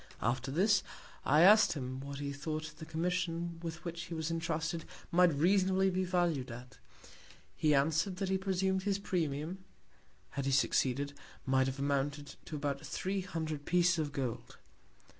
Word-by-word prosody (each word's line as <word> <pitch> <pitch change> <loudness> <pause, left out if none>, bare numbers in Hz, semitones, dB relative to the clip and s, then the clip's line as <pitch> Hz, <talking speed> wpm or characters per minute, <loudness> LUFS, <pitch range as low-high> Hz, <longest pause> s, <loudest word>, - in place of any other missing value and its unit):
After 125 +3 0
this, 190 +7 +3 0.5
I 150 +3 +5
ask'd 210 +5 +7
him 130 -2 -5
what 140 +1 -6
he 140 0 -3
thought 155 +2 -4
the 160 - -8
Commission 170 0 -2
with 170 0 -6
which 170 0 -4
he 165 - -6
was 160 0 -2
entrusted, 165 0 -2 0.3
might 180 0 +5
reasonably 190 +5 +3
be 185 +1 0
valued 175 -8 0
at; 125 +2 -10 0.8
he 150 -1 +3
answer'd, 160 +6 +2
that 190 +1 -2
he 190 0 +1
presum'd 190 0 0
his 200 0 0
Premium 170 -2 -2 0.7
(had 140 -1 -3
he - - +1
succeeded) 135 +2 +2 0.3
might 130 -1 +3
have 135 0 -3
amounted 145 +1 -1
to 155 - -6
about 140 -1 -2
three 190 +1 -2
Hundred 160 -5 -4
Pieces 175 0 +3
of 150 -2 -1
Gold. 125 -4 -4
160 Hz, 160 wpm, -33 LUFS, 140-180 Hz, 0.8 s, ask'd